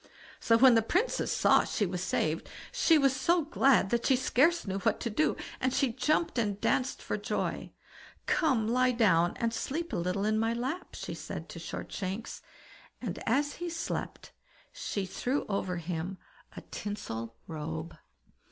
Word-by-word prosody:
So 230 - +4
when 255 +1 +7
the 225 - +5
Princess 370 - 0
saw - - +4
she 210 - -1
was 180 -1 -3
saved, 165 -3 -1 0.2
she 325 - +4
was 275 -2 +3
so 335 +6 +2
glad 275 - +3
that 235 0 +1
she 265 - +4
scarce 285 +7 +3
knew 195 -1 -2
what - - +1
to 230 - -2
do, 310 +9 +1 0.2
and 260 - +1
she 255 -2 +1
jumped 305 0 +1
and 205 -3 -1
danced 255 +4 0
for - - -2
joy. - - -3 0.5
"Come, 260 -10 +2
lie 255 +2 +3
down, 175 -7 +3
and 230 -1 0
sleep 315 +9 -3
a - - 0
little 180 +3 -1
in 215 0 +2
my 225 +1 +1
lap", 265 +10 -4
she - - -5
said - - -6
to - - -8
Shortshanks, 195 +3 -5 0.6
and 215 -8 -4
as 285 +5 +1
he 350 0 -4
slept 330 +1 -4 0.4
she 200 -2 -3
threw 255 +8 -2
over 190 -3 -2
him 170 +2 -4 0.4
a - - -5
tinsel 115 - -6
robe. 160 +1 -5
230 Hz, 165 wpm, -30 LUFS, 190-270 Hz, 0.6 s, when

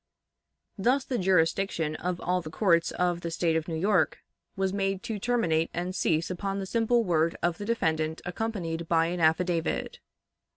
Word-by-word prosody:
Thus 255 +7 +2
the 250 - -2
jurisdiction 170 -3 +1
of 180 0 -3
all 180 +1 0
the 155 - -7
courts 170 0 +2
of 175 -1 0
the 170 - -3
State 165 0 0
of 160 0 -1
New 165 - -3
York 180 -2 +2 0.4
was 190 0 0
made 195 -1 -1
to 220 -2 -4
terminate 170 -9 +1
and 175 +2 -2
cease 165 -1 +1
upon 195 +2 -3
the 195 - -3
simple 230 +3 +2
word 165 -3 +1
of 170 -1 0
the 205 - -4
defendant 160 -8 0
accompanied 175 -4 -3
by 165 -1 +4
an 175 +1 -2
affidavit. 165 +1 +1
180 Hz, 170 wpm, -28 LUFS, 165-195 Hz, 0.4 s, by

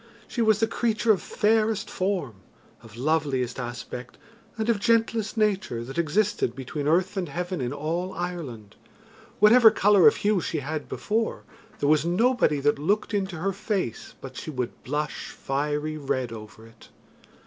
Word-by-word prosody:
She 240 - -3
was 220 -2 +4
the 225 - +4
creature 225 0 +1
of 200 - +2
fairest 215 -1 +1
form, 185 - -2 0.4
of 115 -1 -14
loveliest 135 -3 0
aspect, 120 0 -7 0.4
and 220 0 -1
of 230 -3 +2
gentlest 225 0 +1
nature 200 - 0
that 135 +7 -5
existed 170 - +1
between 140 +2 -4
earth 180 +5 +2
and 180 -5 -2
heaven 175 +1 -3
in 125 -1 -2
all 165 +6 -2
Ireland 160 - -6 0.6
whatever 225 +2 +8
colour 205 -2 +5
of 220 - +6
hue 205 -3 +1
she 155 -2 -2
had 150 +2 -4
before, 225 +1 -2 0.3
there 145 - 0
was 155 -1 +4
nobody 180 - +2
that 145 0 +2
looked 205 +8 0
into 190 -3 -1
her 190 +4 -1
face 195 - -3
but 130 -1 -9
she - - -6
would 125 -5 -4
blush 150 +2 -3
fiery 150 +2 -2
red 130 -4 -2
over 110 0 -10
it. 115 0 -18
170 Hz, 160 wpm, -26 LUFS, 135-210 Hz, 0.6 s, whatever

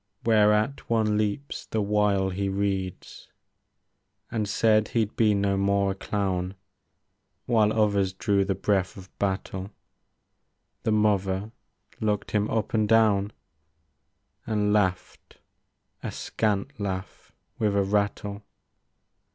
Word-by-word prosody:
Whereat 105 +3 +3
one 110 -2 +2
leaps 105 +6 -2
the 110 - -2
while 100 -2 +1
he 100 +1 -2
reads. 95 -2 -3 1.0
And 105 -3 -1
said 110 0 +3
he'd 110 -2 -1
be 105 -2 +3
no 100 -1 +1
more 100 0 +2
a - - -1
clown. 95 -2 -2 0.9
While 110 -3 +3
others 100 -3 +2
drew 100 0 +1
the 95 0 -1
breath 95 -3 0
of 95 -1 -13
battle. 95 -1 -2 0.6
— - - -51
The 110 - +2
mother 100 -1 +1 0.5
looked 105 -1 -1
him 105 0 +1
up 110 -3 -1
and 110 -2 +2
down. 105 -3 +4 1.2
And 105 -2 +1
laughed 95 -3 -1 0.3
— - - -50
a - - -4
scant 110 +5 -2
laugh 95 -2 -5 0.3
with 105 -2 +1
a 100 - +3
rattle. 100 0 -1
105 Hz, 120 wpm, -26 LUFS, 100-110 Hz, 1.2 s, down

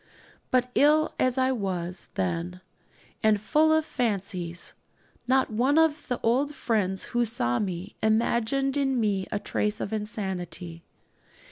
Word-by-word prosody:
But 250 0 +1
ill 305 +3 +4
as 255 0 +2
I 260 0 +3
was 185 -6 -3
then, 90 -1 -2 0.6
and 215 -1 +3
full 310 +8 +3
of 315 0 +3
fancies, 195 - -2 0.5
not 260 -1 +3
one 255 +7 +2
of 315 -2 +2
the 245 - -2
old 275 +6 +1
friends 190 -5 0
who 240 0 +3
saw 120 - 0
me 190 0 -4
imagined 235 +5 +1
in 270 -3 +1
me 200 -4 0
a - - 0
trace 210 +1 -1
of 200 - -4
insanity. 185 -5 -4
220 Hz, 135 wpm, -27 LUFS, 190-260 Hz, 0.6 s, ill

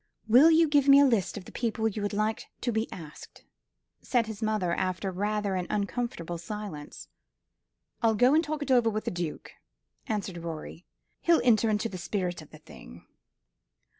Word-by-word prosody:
"Will 255 +9 +7
you 325 0 +5
give 290 -2 +3
me 275 0 +8
a 285 - +7
list 230 -6 +1
of 190 - -8
the - - -12
people 225 -2 -1
you 215 -1 -3
would 205 - -2
like 215 +1 -1
to 245 - 0
be 220 0 -2
asked?" 160 -3 -11 0.6
said 240 -3 +1
his 220 -1 -8
mother, 215 -5 0
after 185 +2 -2
rather 205 +1 -1
an 180 -1 -2
uncomfortable 200 -5 -3
silence. 200 -6 -7 0.9
"I'll 225 -2 +3
go 245 +5 +4
and 320 +2 +4
talk 305 -1 -3
it 280 - -3
over 240 -3 +4
with 215 0 -3
the - - -1
Duke," 175 -3 -5 0.6
answered 200 -5 -3
Rorie. 165 +1 -8 0.3
"He'll 335 -1 +4
enter 230 -2 +4
into 215 +1 0
the 185 -5 -7
spirit 180 -2 -3
of 155 - -14
the - - -13
thing." - - -14
215 Hz, 180 wpm, -28 LUFS, 185-240 Hz, 0.9 s, me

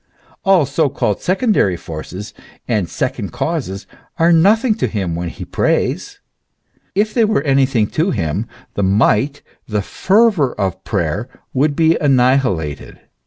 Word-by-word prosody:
All 190 -6 +4
so 140 +2 +1
called 105 -6 -1
secondary 185 - +1
forces 85 +6 -8 0.3
and 105 -7 0
second - - -3
causes 95 +2 -3 0.3
are 170 0 +4
nothing 215 +8 +4
to - - 0
him 95 -6 -2
when 85 +1 -3
he - - -8
prays; - - -1 0.8
if 210 +2 +1
they 235 - +3
were 215 -10 +1
anything 135 -5 +2
to 165 +5 +1
him, 80 - -2 0.3
the - - -2
might, 110 +8 +2 0.2
the 105 -3 -1
fervour 195 - +2
of 95 -1 -2
prayer 95 +4 -2 0.2
would 145 +2 +1
be 165 +1 +3
annihilated. 125 - +1
130 Hz, 135 wpm, -17 LUFS, -, 0.8 s, All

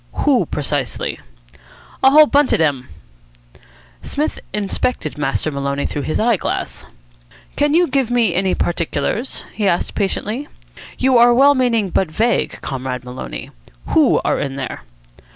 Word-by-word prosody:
"Who, - - +3
precisely?" - - -2 0.8
"A 265 - +8
whole 305 +2 +8
bunch 290 -1 +2
of - - +4
dem." 140 -5 0 1.1
Psmith 300 +2 -3
inspected 205 -4 -2
Master 150 +1 -1
Maloney 140 0 -2
through 145 - -3
his 150 +3 -2
eye 230 -1 +3
glass. - - -4 0.7
"Can 290 +1 +2
you 350 +1 +5
give 265 -3 0
me 235 -6 +2
any 185 +1 +1
particulars?" 175 - -2
he 210 -2 -1
asked 175 -2 0
patiently. 215 +6 -2 0.5
"You 260 -2 +3
are 240 0 +6
well 280 +3 +6
meaning, 230 -7 +1
but 185 -1 +1
vague, 225 +9 0
Comrade 130 -2 -4
Maloney. 125 - -7 0.4
Who - - +4
are - - +1
in 135 -1 -3
there?" 135 -3 -5
205 Hz, 140 wpm, -19 LUFS, -, 1.1 s, A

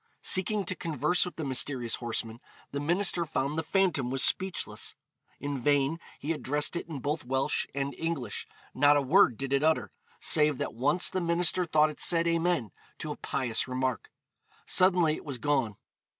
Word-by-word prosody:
Seeking 195 +2 +2
to 185 - -1
converse 165 0 0
with 180 - -7
the 160 - -5
mysterious 130 -3 0
horseman, 115 -1 -4 0.3
the 140 - -3
minister 175 +3 +3
found 150 -2 -2
the 160 - 0
phantom 160 -6 +1
was 135 +1 -1
speechless. 190 -1 -2 0.4
In 145 -2 -4
vain 145 +4 +1 0.2
he 150 - -3
addressed 150 +1 -1
it 170 - -4
in 155 - -5
both 150 +3 -2
Welsh 130 +2 0
and 140 0 -2
English; 155 -10 -4 0.3
not 145 +2 +5
a - - +2
word 135 - +4
did 135 0 -3
it 140 - +2
utter, 160 0 +1 0.3
save 150 -3 +3
that - - -3
once 145 +9 +2
the 185 - -2
minister 170 +1 +2
thought 155 -1 +3
it 150 - -14
said 170 -1 +3
'Amen,' 165 - 0 0.3
to - - -5
a - - -4
pious 125 -3 -1
remark. 130 -1 -2 0.6
Suddenly 175 -4 +4
it - - -11
was 140 -5 -5
gone. 130 -6 0
150 Hz, 175 wpm, -29 LUFS, 135-170 Hz, 0.6 s, not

